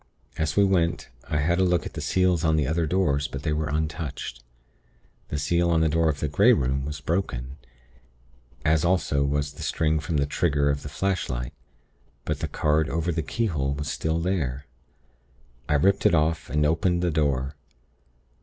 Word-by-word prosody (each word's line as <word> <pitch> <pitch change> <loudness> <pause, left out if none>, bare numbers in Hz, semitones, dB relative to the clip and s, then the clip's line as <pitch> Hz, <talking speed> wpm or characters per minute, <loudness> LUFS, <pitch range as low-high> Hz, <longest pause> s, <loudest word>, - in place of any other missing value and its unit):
As 80 -2 -1
we 100 - +5
went, 85 -7 +1 0.2
I 75 - 0
had 85 +4 +1
a - - +4
look 90 -1 +1
at - - -7
the - - -5
seals 90 -3 +2
on 80 -1 +3
the 75 -3 +1
other 80 +3 0
doors; 75 -5 +1
but 70 0 -7
they 75 - 0
were 75 0 -1
untouched. 75 -4 -4 0.8
The 75 - -3
seal 85 +4 +1
on 80 -1 +3
the 80 - +3
door 80 +1 +2
of 70 -2 -2
the 75 - 0
Grey 100 - +5
Room 65 - 0
was 75 0 -5
broken, 70 -5 -3 1.1
as 75 0 +3
also 85 -6 +2
was 70 +1 -1
the - - -11
string 80 -1 +1
from 75 +1 -2
the 70 - +2
trigger 70 -1 +1
of 70 0 -3
the 75 - -7
flashlight; 70 -8 -2 0.7
but - - -2
the - - -2
card 75 +1 +1
over 85 +1 -1
the 80 0 -1
keyhole 75 -6 -1
was 75 0 -4
still 80 0 -1
there. 75 -7 -2 1.0
I 75 - +3
ripped 95 +7 +3
it - - +3
off, 80 0 0
and 75 0 +1
opened 85 +3 +1
the 90 - +1
door. 70 -2 0
75 Hz, 185 wpm, -25 LUFS, 70-85 Hz, 1.1 s, we